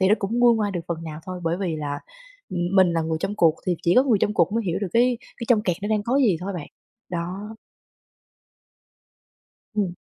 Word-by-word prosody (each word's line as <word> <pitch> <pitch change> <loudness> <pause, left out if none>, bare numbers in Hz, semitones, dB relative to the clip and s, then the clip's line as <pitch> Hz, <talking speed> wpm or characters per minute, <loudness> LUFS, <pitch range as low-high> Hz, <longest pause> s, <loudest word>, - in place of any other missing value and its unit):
thì 190 - +4
nó 210 - +6
cũng 210 +4 -2
nguôi 240 -1 +6
ngoai 210 -2 0
được 175 - -2
phần 165 -1 -3
nào 155 -1 -7
thôi, 185 -1 -5
bởi 165 +1 +1
vì 175 -5 -1
là, 145 -1 -4 0.5
ừm, 175 - -2 0.2
mình 185 -2 +5
là 165 -1 +1
người 160 0 -1
trong 195 +3 -2
cuộc 165 -5 +4
thì 180 -1 +1
chỉ 175 - +3
có 255 - +8
người 245 -6 +3
trong 210 - +1
cuộc - - +2
mới 230 0 0
hiểu 175 - 0
được 200 - -2
cái 245 +1 +3 0.2
cái 235 - -4
trong 225 -4 +4
kẹt 180 -4 0
nó 205 - -2
đang 215 -1 +1
có 245 +4 +1
gì 225 -11 +4
thôi 195 +2 -4
bạn. 165 -5 -6 0.4
Đó. 185 +5 -5 2.2
Ừm. 195 -4 0
190 Hz, 230 wpm, -24 LUFS, 170-215 Hz, 2.2 s, có